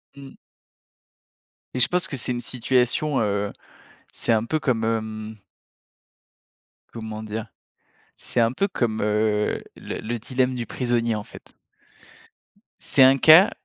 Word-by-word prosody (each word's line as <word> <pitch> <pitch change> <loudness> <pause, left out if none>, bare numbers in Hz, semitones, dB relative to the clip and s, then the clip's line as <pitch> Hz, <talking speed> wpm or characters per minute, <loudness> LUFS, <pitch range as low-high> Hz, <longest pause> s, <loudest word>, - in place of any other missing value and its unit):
Mmh. 140 -1 -12 1.4
Et 130 - -3
je 125 - +6
pense 180 0 +1
que 135 - -3
c'est 125 - -1
une 120 -1 -3
situation, 130 +4 0
heu, 100 -1 -1 0.6
c'est - - 0
un 110 -1 +1
peu 155 +6 -1
comme, 120 -6 0
hem 110 -1 -3 1.6
comment 110 -1 -7
dire? 110 +1 -5 0.7
C'est 125 - -2
un 115 0 +3
peu 195 +10 0
comme, 115 - -2
heu, 105 0 0
le - - -6
le 120 +2 -4
dilemme 130 +2 -1
du 120 -2 -4
prisonnier, 120 -2 -1
en 105 -1 -4
fait. - - -15 1.3
C'est 135 - +5
un 135 +1 +6
cas, 160 - +7
115 Hz, 135 wpm, -23 LUFS, 110-130 Hz, 1.6 s, cas